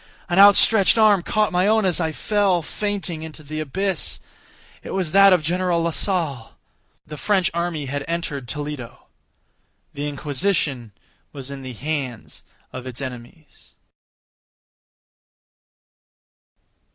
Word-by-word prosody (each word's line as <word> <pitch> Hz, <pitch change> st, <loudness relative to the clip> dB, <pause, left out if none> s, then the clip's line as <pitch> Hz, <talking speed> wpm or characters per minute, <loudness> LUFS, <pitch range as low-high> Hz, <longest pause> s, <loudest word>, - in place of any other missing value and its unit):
An 175 Hz, +2 st, +2 dB
outstretched 200 Hz, +1 st, +6 dB
arm 210 Hz, -4 st, +5 dB
caught 215 Hz, +4 st, 0 dB
my 180 Hz, +2 st, +2 dB
own 220 Hz, -1 st, +3 dB
as 180 Hz, -2 st, +2 dB
I 160 Hz, -2 st, 0 dB
fell, 195 Hz, 0 st, +1 dB
fainting, 195 Hz, -3 st, -3 dB
into 160 Hz, -1 st, -9 dB
the 155 Hz, +2 st, -6 dB
abyss. 190 Hz, +6 st, -2 dB, 0.6 s
It -, -, -6 dB
was 185 Hz, -5 st, -1 dB
that 195 Hz, +1 st, +7 dB
of 180 Hz, -4 st, +3 dB
General 175 Hz, +1 st, 0 dB
Lasalle. 165 Hz, -, -2 dB, 0.5 s
The 150 Hz, 0 st, -9 dB
French 190 Hz, +1 st, +1 dB
army 170 Hz, -3 st, -2 dB
had 140 Hz, +1 st, -4 dB
entered 165 Hz, -6 st, -3 dB
Toledo. 145 Hz, -3 st, -6 dB, 0.9 s
The 145 Hz, +1 st, -4 dB
Inquisition 145 Hz, -, -1 dB, 0.4 s
was 140 Hz, -2 st, -7 dB
in 140 Hz, -1 st, -7 dB
the 130 Hz, -1 st, -7 dB
hands 135 Hz, -2 st, -5 dB, 0.3 s
of 130 Hz, 0 st, -7 dB
its 125 Hz, -1 st, -8 dB
enemies. 130 Hz, +3 st, -10 dB
160 Hz, 120 wpm, -22 LUFS, 140-190 Hz, 0.9 s, that